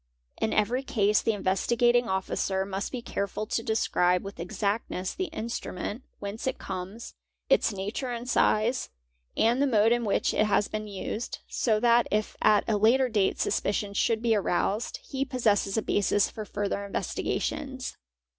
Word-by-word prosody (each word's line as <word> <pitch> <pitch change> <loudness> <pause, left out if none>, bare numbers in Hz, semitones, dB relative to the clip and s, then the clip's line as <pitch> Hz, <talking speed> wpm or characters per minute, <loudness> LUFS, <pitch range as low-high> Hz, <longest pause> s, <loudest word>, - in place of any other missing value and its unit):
In 220 - +1
every 235 +5 +1
case 210 -5 +2
the 225 - +1
Investigating" 235 +5 +2
Officer 190 0 -1
must 195 +1 -4
be 250 -3 -5
careful 200 0 -3
to 230 - -1
describe 180 -5 +1
with 195 -2 -8
exactness 200 0 -2
the 375 - -2
instrument, 225 - -5 0.2
whence 205 +5 -5
it 260 - -1
comes, 190 +5 -6 0.4
its - - +4
nature 205 +6 -4
and 240 0 -4
size, 235 0 +2 0.5
and 235 +4 +3
the 285 - +4
mode 225 -3 +4
in 240 0 +2
which 205 - +1
it 215 - +2
has 205 0 +2
been 215 0 -4
used, 210 +3 -4
so 220 -3 +1
that 235 0 +4
if 215 0 -1
at 210 - +5
a 220 -2 +2
later 250 +5 +4
date 205 -4 +1
suspicion 200 0 0
should 225 +2 +1
be 230 -1 +3
aroused, 205 +2 0
he 270 0 -2
possesses 225 -6 +1
a 220 - +1
basis 205 0 +2
for 215 - -6
further 200 0 -2
investigations. 260 +6 -3
215 Hz, 160 wpm, -28 LUFS, 200-235 Hz, 0.5 s, at